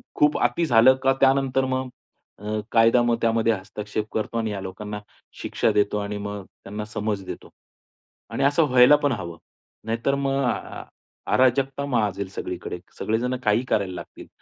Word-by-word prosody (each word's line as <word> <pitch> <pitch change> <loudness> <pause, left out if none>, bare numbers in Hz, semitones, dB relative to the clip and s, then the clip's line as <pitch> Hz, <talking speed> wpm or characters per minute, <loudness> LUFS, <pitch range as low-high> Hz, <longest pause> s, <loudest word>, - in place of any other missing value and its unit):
खूप 150 0 +3
अति 120 +8 +2
झालं 125 -1 +6
का 135 - +4
त्यानंतर 135 -1 +3
मग 130 0 -2 0.5
अ, 105 +1 -3
कायदा 115 +1 +5
मग 120 -1 +2
त्यामध्ये 115 0 +2
हस्तक्षेप 105 +2 -5
करतो 110 +1 -2
आणि 110 -1 -1
ह्या 100 -2 -4
लोकांना 105 +2 -6 0.4
शिक्षा - - 0
देतो 105 0 +1
आणि 105 0 -3
मग 100 -1 -5
त्यांना 105 +2 -8
समज 105 -2 -3
देतो. - - -8 0.8
आणि - - -2
असं 145 +4 +4
व्हायला 125 +3 +7
पण 145 - +3
हवं. 85 -7 -5 0.5
नाहीतर 115 +5 0
मग 135 0 +1
अ - - +3 0.3
अ - - -11 0.5
अराजकता 135 +2 +2
माजेल 105 -7 -1
सगळीकडे. - - -6 0.2
सगळे 110 +1 0
जण 125 +1 -1
काही 105 +3 +2
करायला 95 -3 0
लागतील. 85 - -10
115 Hz, 160 wpm, -24 LUFS, 105-130 Hz, 0.8 s, व्हायला